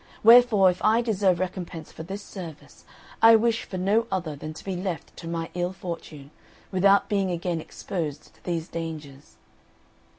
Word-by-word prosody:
Wherefore, 225 -5 +7
if 180 - -9
I 225 +2 +4
deserve 195 -6 +2
recompense 180 -3 -5
for - - -10
this 195 +5 -6
service, 170 -8 -10 0.4
I 225 0 +9
wish 225 0 +1
for 185 - -6
no 205 +5 +1
other 170 -5 -2
than 155 +2 -7
to - - -10
be 190 -2 -3
left 180 -4 -5
to 165 - -8
my 165 -1 -4
ill 175 +1 -2
fortune, 160 -6 -8 0.4
without 195 +1 +4
being 200 -3 0
again 170 -1 -2
exposed 155 -4 -6
to - - -27
these 170 -2 -3
dangers." 155 -4 -7
180 Hz, 165 wpm, -25 LUFS, 165-200 Hz, 0.4 s, I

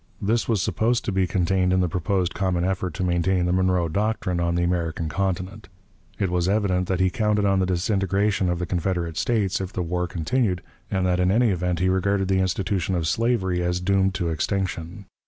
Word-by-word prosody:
This 110 +4 0
was 105 -5 +1
supposed 115 +2 0
to - - -1
be 95 -1 +1
contained 90 0 +1
in 95 - +3
the 90 - +2
proposed 90 +1 -1
common 95 -3 0
effort 95 -3 -2
to 95 - -2
maintain 90 +1 +1
the 90 - +1
'Monroe 90 -2 +2
doctrine' 100 0 -1
on 85 0 0
the 85 - +1
American 85 -2 -1
Continent. 95 +3 -3 0.5
It 95 -3 -1
was 90 0 +1
evident 95 -3 +1
that 95 -2 -1
he 95 0 +2
counted 105 0 +1
on 95 -1 +3
the 95 - +1
disintegration 95 +1 +1
of 90 - 0
the 90 - -2
Confederate 85 -2 -2
States 105 -2 0
if 95 -1 -4
the 90 - -2
war 90 +1 -1
continued, 90 +3 -1 0.3
and 95 -2 0
that 90 -1 +1
in 90 0 +2
any 115 +3 +3
event 90 -1 -1
he 90 +2 +1
regarded 95 +1 +1
the 95 -1 +2
institution 95 0 -1
of 85 -2 -1
slavery 95 -5 +1
as 90 0 0
doomed 95 +1 +1
to 85 -3 -1
extinction. 90 +2 -3
95 Hz, 205 wpm, -24 LUFS, 90-100 Hz, 0.5 s, in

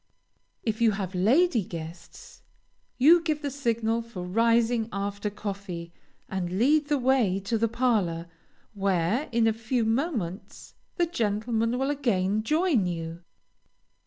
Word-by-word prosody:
If 220 0 -2
you 225 -2 +4
have 195 -2 -4
lady 235 - +3
guests, 165 0 -10 0.6
you 325 +7 +6
give 310 -2 -2
the 285 - -2
signal 235 -4 0
for 230 -6 -8
rising 230 +3 +2
after 200 +1 -3
coffee, 195 -5 -6 0.3
and 185 -1 -3
lead 290 +6 +3
the 295 0 +2
way 245 -7 +2
to 200 +4 -2
the 230 +1 +2
parlor, 215 -9 0 0.5
where, 195 - 0
in 230 -1 +2
a 225 - +3
few 230 +1 -1
moments, 225 - -3 0.2
the 350 - +2
gentlemen 230 -5 -1
will 270 +2 0
again 215 -8 0
join 305 - +2
you. 165 -1 -5
225 Hz, 130 wpm, -27 LUFS, 195-255 Hz, 0.6 s, you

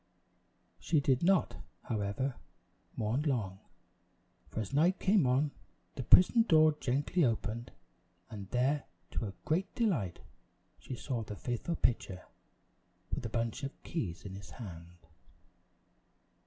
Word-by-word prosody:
She 160 - +2
did 135 -3 +2
not, 185 0 +3 0.3
however, 110 +5 -1 0.6
mourn 110 +6 0
long, 115 -11 -1 0.9
for - - -4
as 110 +3 -4
night 170 +7 +4
came 190 -7 +4
on, 135 +4 +2 0.4
the - - -4
prison 185 - +7
door 155 -7 +6
gently 145 +7 +1
opened, 115 -1 -1 0.6
and 100 -3 -8
there, 135 +4 +1 0.3
to - - -1
her 105 -4 -4
great 170 +6 0
delight, 155 - 0 0.6
she 130 - -6
saw 125 -1 -3
the 105 -1 -6
faithful 120 +10 -2
pitcher, 100 - 0 0.9
with 120 - -2
a - - -7
bunch 115 0 -2
of 135 +1 -6
keys 105 - -4
in 95 - -6
his 95 -4 -9
hand. 85 -3 -9
125 Hz, 130 wpm, -33 LUFS, 105-155 Hz, 0.9 s, prison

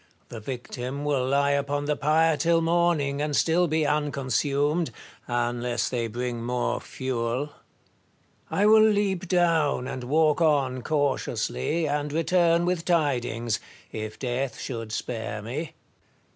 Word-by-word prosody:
The 115 - -7
victim 125 +3 -5
will 135 -3 +1
lie 140 +1 +2
upon 140 +1 0
the 150 0 +1
pyre 155 +3 +3
till 165 +2 +2
morning, 165 -4 +1
and 150 -1 -1
still 170 +4 +3
be 155 0 +1
unconsumed, 145 +2 0 0.4
unless 120 -1 -1
they 120 -2 -1
bring 120 +1 -4
more 120 0 -1
fuel. 130 +2 -3 1.0
I 200 - +1
will 215 +1 +7
leap 205 -4 +2
down 165 -7 +2
and 130 -2 -5
walk 155 +4 +2
on 140 -5 +2
cautiously, 145 - -1
and 145 0 -1
return 170 +2 +2
with 175 -2 0
tidings, 120 -9 0 0.3
if 110 0 -5
death 125 0 -2
should 115 -3 -5
spare 110 -1 -4
me. 130 +10 -5
145 Hz, 130 wpm, -26 LUFS, 125-160 Hz, 1.0 s, will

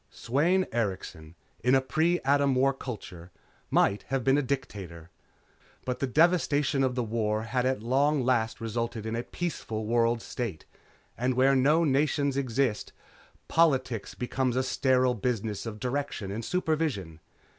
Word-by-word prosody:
Sweyn 170 +10 +1
Erikson, 95 -7 -4 0.3
in 125 +2 +4
a - - +5
pre 160 +6 +1
Atom 140 0 +2
War 135 +2 +3
culture, 95 -10 -8 0.4
might 100 +1 +2
have 135 -1 -1
been 135 +3 +4
a 145 - +3
dictator. 95 - -5 0.7
But 125 0 -2
the 135 - 0
devastation 150 -2 +2
of 130 -2 0
the 125 - 0
war 110 -1 -1
had 125 +2 0
at 130 -5 -1
long 140 +3 +2
last 120 -3 +1
resulted 115 0 -3
in 110 +1 -2
a 115 - -1
peaceful 120 -8 -4
world 115 +1 +2
state, 110 -11 -5 0.5
and 125 +1 0
where 135 +2 +4
no 150 +6 +4
nations 140 -1 +1
exist, 130 -4 -1 0.5
politics 130 -9 +1
becomes 125 0 -1
a 130 - +1
sterile 130 -1 +2
business 115 -2 -2
of 110 -1 -6
direction 125 -6 -3
and 110 +3 -4
supervision. 150 - -1
125 Hz, 145 wpm, -28 LUFS, 110-140 Hz, 0.7 s, a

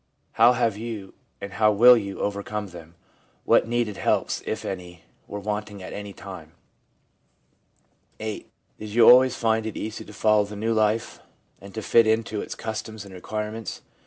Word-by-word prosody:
How 120 +2 +5
have 115 -4 0
you, 110 -4 -6 0.3
and 100 0 -7
how 105 +3 +4
will 120 +4 +8
you, 100 -4 -4
overcome 105 0 -3
them? 85 -1 -12 0.5
What - - +4
needed 115 -4 -1
helps, - - 0
if - - -3
any, 90 -2 -7 0.2
were 105 - -6
wanting 105 -1 -4
at - - -8
any 100 0 -6
time? 90 -6 -10 1.7
i - - -7
VIII. 110 -1 -5 0.3
Did 110 - -7
you 120 -1 +6
always 130 +1 +7
find 110 -1 0
it 110 - -6
easy 110 0 -5
to - - -13
follow 105 0 +3
the 105 +1 -9
new 110 +3 -1
life, 110 +1 0 0.4
and 100 - -11
to 110 - -4
fit 115 +1 +4
into 110 -1 0
its - - -6
customs 110 -1 -6
and 100 - -12
requirements? 105 +4 -5
105 Hz, 170 wpm, -25 LUFS, 100-110 Hz, 1.7 s, will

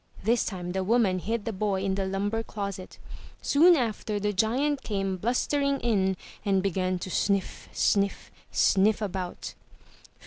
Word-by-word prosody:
This 230 +4 +2
time 180 -3 -4
the 190 +1 -1
woman 200 -3 +2
hid 225 +3 -3
the 225 - -2
boy 195 -1 -1
in 195 -1 0
the 190 0 -1
lumber 205 +4 -1
closet. 200 -4 -6 0.4
Soon 340 +5 +5
after 220 -5 -1
the 210 +1 -1
giant 260 +8 +1
came 195 -3 -2
blustering 275 +7 0
in 190 -5 +1 0.3
and 195 -2 +1
began 185 -1 0
to 185 +1 -6
sniff, 200 0 -1
sniff, 200 -1 0 0.2
sniff 200 +2 +3
about. 190 -4 -4
200 Hz, 145 wpm, -27 LUFS, 190-225 Hz, 0.4 s, Soon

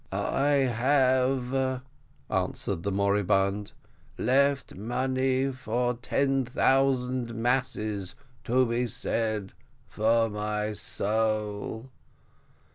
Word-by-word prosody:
"I 145 +2 +1 0.2
have," 130 0 +2 0.4
answered 85 - -2
the 100 - -2
moribund, 100 0 +1 0.5
"left 140 +2 +2
money 130 +4 0
for 125 -1 -1
ten 135 +2 0
thousand 130 -2 +1
masses 110 -6 -1 0.3
to 130 +2 +3
be 120 +1 0
said 110 -4 -2 0.3
for 115 +1 +2
my 105 0 -2
soul." 110 +3 -2
120 Hz, 80 wpm, -28 LUFS, 105-130 Hz, 0.5 s, to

